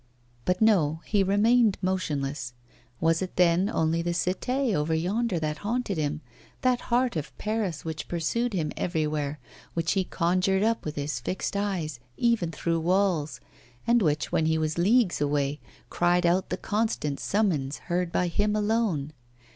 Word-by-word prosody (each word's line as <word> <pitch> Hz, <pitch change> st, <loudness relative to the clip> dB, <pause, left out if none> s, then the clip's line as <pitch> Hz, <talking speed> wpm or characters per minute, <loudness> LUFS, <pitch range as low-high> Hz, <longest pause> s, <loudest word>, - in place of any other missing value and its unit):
But 180 Hz, +3 st, +2 dB
no; 165 Hz, -8 st, +3 dB
he 205 Hz, -1 st, +2 dB
remained 210 Hz, +3 st, +4 dB
motionless. 145 Hz, -9 st, -2 dB, 0.5 s
Was 165 Hz, +1 st, +2 dB
it 185 Hz, -, -4 dB
then 180 Hz, +2 st, +3 dB
only 160 Hz, -4 st, +1 dB
the 170 Hz, 0 st, -1 dB
Cité 230 Hz, +9 st, 0 dB
over 160 Hz, -1 st, +1 dB
yonder 195 Hz, +5 st, 0 dB
that 150 Hz, -1 st, -2 dB
haunted 210 Hz, -4 st, -2 dB
him, 150 Hz, 0 st, -1 dB, 0.4 s
that 255 Hz, -2 st, +2 dB
heart 245 Hz, -1 st, +2 dB
of 150 Hz, -2 st, -5 dB
Paris 210 Hz, -8 st, -2 dB
which 160 Hz, -1 st, -4 dB
pursued 220 Hz, +8 st, -1 dB
him 160 Hz, -5 st, -1 dB
everywhere, 150 Hz, -4 st, -1 dB, 0.4 s
which 165 Hz, -1 st, 0 dB
he 195 Hz, -, +2 dB
conjured 185 Hz, +3 st, +1 dB
up 225 Hz, +1 st, 0 dB
with 150 Hz, -, -4 dB
his 145 Hz, -3 st, -2 dB
fixed 185 Hz, +10 st, -3 dB
eyes, 180 Hz, -9 st, -2 dB, 0.2 s
even 230 Hz, -8 st, +2 dB
through 165 Hz, +2 st, -1 dB
walls, 175 Hz, -3 st, +1 dB, 0.5 s
and 235 Hz, 0 st, +4 dB
which, 150 Hz, -5 st, 0 dB
when 160 Hz, -, +2 dB
he 160 Hz, 0 st, +2 dB
was 155 Hz, +1 st, -1 dB
leagues 205 Hz, -, +3 dB
away, 145 Hz, 0 st, 0 dB, 0.3 s
cried 175 Hz, 0 st, +2 dB
out 180 Hz, +2 st, +2 dB
the -, -, -2 dB
constant 210 Hz, -10 st, -1 dB
summons 160 Hz, -10 st, 0 dB
heard 175 Hz, -1 st, -2 dB
by 180 Hz, -, +1 dB
him 205 Hz, +5 st, 0 dB
alone? 205 Hz, -9 st, 0 dB
175 Hz, 155 wpm, -27 LUFS, 155-205 Hz, 0.5 s, remained